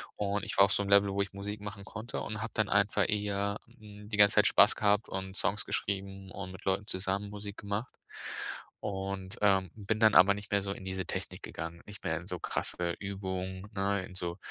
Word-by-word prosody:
Und 100 -1 -1
ich - - -3
war 100 - +10
auf 100 - +1
so 100 - +3
'nem 100 - -4
Level, 100 0 +7
wo 100 +1 0
ich 100 - -9
Musik 105 +1 -5
machen 105 -1 -7
konnte 110 +3 -5
und 105 0 -4
habe 115 - -4
dann 110 -2 +2
einfach 100 0 +3
eher, 100 -1 0 0.2
ähm, 105 -1 -12
die 105 - -2
ganze 100 0 +7
Zeit 105 - +6
Spaß 100 - +6
gehabt 105 +1 +2
und 95 0 -5
Songs 105 - +2
geschrieben 95 -1 -2
und 95 -2 -6
mit 95 - -10
Leuten 95 +2 +1
zusammen 95 +2 0
Musik 100 0 -7
gemacht. 100 +4 -3 0.9
Und, 95 +1 -4
ähm, 95 -3 +4
bin 110 0 -2
dann 110 -1 +5
aber 100 +3 +8
nicht 100 +1 -8
mehr 100 -1 +3
so 100 - -2
in 95 - -10
diese 95 -1 -3
Technik - - -5
gegangen, 80 +2 -6
nicht 105 -1 -11
mehr - - 0
in - - -8
so - - -4
krasse 85 -1 -2
Übungen, 95 -1 -4
ne, 100 0 +1
in 90 - -12
so, 85 0 -3
100 Hz, 220 wpm, -31 LUFS, 95-105 Hz, 0.9 s, war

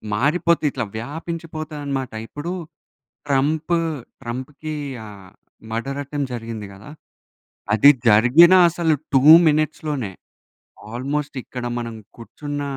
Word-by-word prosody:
మారిపోతాయి 155 +5 +2
ఇట్లా 120 -3 -3
వ్యాపించిపోతాయనమాట. 150 -1 -5 0.2
ఇప్పుడు 145 +7 -6 0.8
ట్రంప్ 150 +5 +1 0.5
ట్రంప్‌కి 135 +6 -6 0.3
ఆహ్, 100 -3 -13 0.4
మర్డర్ 135 +5 -3
అటెంప్ట్ 140 -1 -4
జరిగింది 115 -2 -6
గదా! 100 +8 -13 0.8
అది 110 +7 +7 0.2
జరిగిన 125 - +7 0.2
అసలు 165 -1 +1 0.2
2 135 - +5 0.3
మినిట్స్‌లోనే 150 -6 -1 0.8
ఆల్మోస్ట్ 140 +4 -3
ఇక్కడ 125 -1 -7
మనం 115 -1 -5 0.2
కూర్చున్న 145 +5 -6
140 Hz, 95 wpm, -21 LUFS, 120-155 Hz, 0.8 s, అది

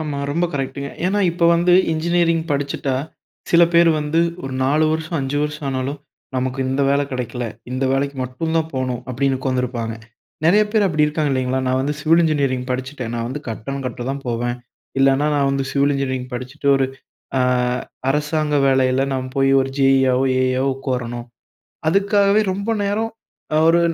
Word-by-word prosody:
ஆமா, 150 -3 -3
ரொம்ப 170 +4 +1
கரெக்ட்டுங்க. 140 0 -3 0.2
ஏன்னா 205 +2 +1
இப்போ 170 0 -1
வந்து 175 +1 +3 0.2
இன்ஜினியரிங் 165 0 +1
படிச்சுட்டா, 140 -1 -1 0.6
சில 170 0 +6
பேர் 170 0 +6
வந்து 150 +3 +1 0.2
ஒரு 130 - -4
4 150 +4 +3
வருஷம், 160 +1 -2
5 135 +2 -2
வருஷம் 150 0 -3
ஆனாலும் 135 +2 -2 0.4
நமக்கு 130 +1 -2
இந்த 135 +2 0
வேலை 140 +1 +2
கிடைக்கல, 125 -1 -3 0.3
இந்த 130 +1 -1
வேலைக்கு 140 +1 -1
மட்டும் 160 +6 -3
தான் 160 0 0
போணும் 125 -2 -2
அப்படின்னு 135 +1 0
உட்காந்துருப்பாங்க. 125 -4 -2 0.5
நிறைய 205 +6 +5
பேர் 210 -3 +3
அப்படி 155 -4 +2
இருக்காங்க 150 -1 -1
இல்லைங்களா? 130 0 0
நான் 130 0 +1
வந்து 145 +3 -1
சிவில் 165 +3 +4
இன்ஜினியரிங் 140 -5 0
படிச்சுட்டேன். 125 -2 -4
நான் 115 0 -2
வந்து 140 +4 -5
கட்டடம் 135 +5 -5
கட்ட 120 -1 -5
தான் 140 0 -5
போவேன். 120 +1 -1 0.4
இல்லனா, 135 +2 +3
நான் 140 -1 +2
வந்து 135 0 -1
சிவில் 140 +1 +2
இன்ஜினியரிங் 130 -2 -3
படிச்சுட்டு 130 +4 -4
ஒரு 135 -1 +2 0.5
அ - - +2 0.7
அரசாங்க 150 +1 0
வேலையில 130 -1 +3
நாம் 130 -1 -2
போய் 135 0 +3
ஒரு 135 - -1
ஜேஇயாகவோ, 135 -1 +4 0.2
ஏஇயவோ 130 +1 +1
உட்காரணும். 120 -3 -4 0.6
அதுக்காகவே, 200 +3 +3
ரொம்ப 200 +4 -3
நேரம் 215 +3 0 0.6
ஒரு 170 +1 +5
140 Hz, 160 wpm, -20 LUFS, 130-155 Hz, 0.7 s, சில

